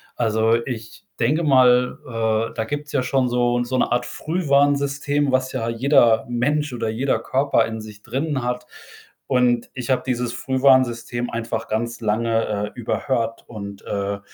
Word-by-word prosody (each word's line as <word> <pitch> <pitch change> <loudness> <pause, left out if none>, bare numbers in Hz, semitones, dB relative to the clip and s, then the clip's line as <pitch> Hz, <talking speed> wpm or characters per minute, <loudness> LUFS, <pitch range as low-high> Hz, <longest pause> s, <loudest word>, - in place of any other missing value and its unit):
Also, 110 -1 +2
ich 115 -4 -7
denke 150 +8 +2
mal, 125 -3 +4 0.5
äh, - - -14
da 110 - -1
gibt's 145 +4 -5
ja 135 -3 +1
schon 130 -1 +1
so 120 0 +1
'n 120 - 0
so 130 +1 -2
'ne - - +1
Art 120 - +1
Frühwarnsystem, 145 -3 +1
was 130 0 +1
ja 115 -3 -3
jeder 115 -2 +3
Mensch 145 +4 0
oder 115 -2 -2
jeder 125 +5 0
Körper 135 -4 +1
in 110 -1 -5
sich 105 -1 -12
drinnen 135 +4 -2
hat 125 0 -3 0.6
und 125 -2 +2
ich 125 -2 -6
habe 130 - +2
dieses 125 -2 -1
Frühwarnsystem 125 -2 +2
einfach 115 0 -3
ganz 115 +1 -2
lange, 115 +1 0 0.3
äh, 125 - -9
überhört 115 -1 -2
und, 100 -3 -8
äh, 100 0 -2
125 Hz, 160 wpm, -22 LUFS, 115-135 Hz, 0.6 s, mal